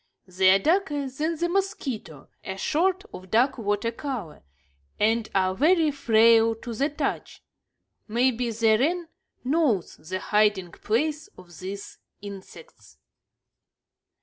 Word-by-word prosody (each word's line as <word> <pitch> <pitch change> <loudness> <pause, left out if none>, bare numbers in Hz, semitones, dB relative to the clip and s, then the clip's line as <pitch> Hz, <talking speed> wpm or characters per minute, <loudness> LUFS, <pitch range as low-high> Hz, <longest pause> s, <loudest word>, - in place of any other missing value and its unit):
They 185 0 +3
are - - +5
darker 300 - 0
than 305 +6 -2
the 345 +2 0
mosquito, 310 - -3 0.2
a 190 0 -6
sort 370 - 0
of 185 0 -10
dark 240 +5 +2
water 205 +1 -1
color, 235 - -6 0.6
and 225 +1 +1
are 185 -1 +2
very 315 - +3
frail 230 -3 +4
to 230 +1 -7
the 275 +7 0
touch. 290 -2 -4 0.6
Maybe 240 +1 +1
the 220 -1 +2
wren 335 +5 0 0.3
knows 260 - 0
the 175 +5 -5
hiding 205 -4 +1
place 300 - -1
of 175 -3 -14
these 195 +2 -7 0.2
insects. 200 - -12
230 Hz, 120 wpm, -25 LUFS, 200-300 Hz, 0.6 s, are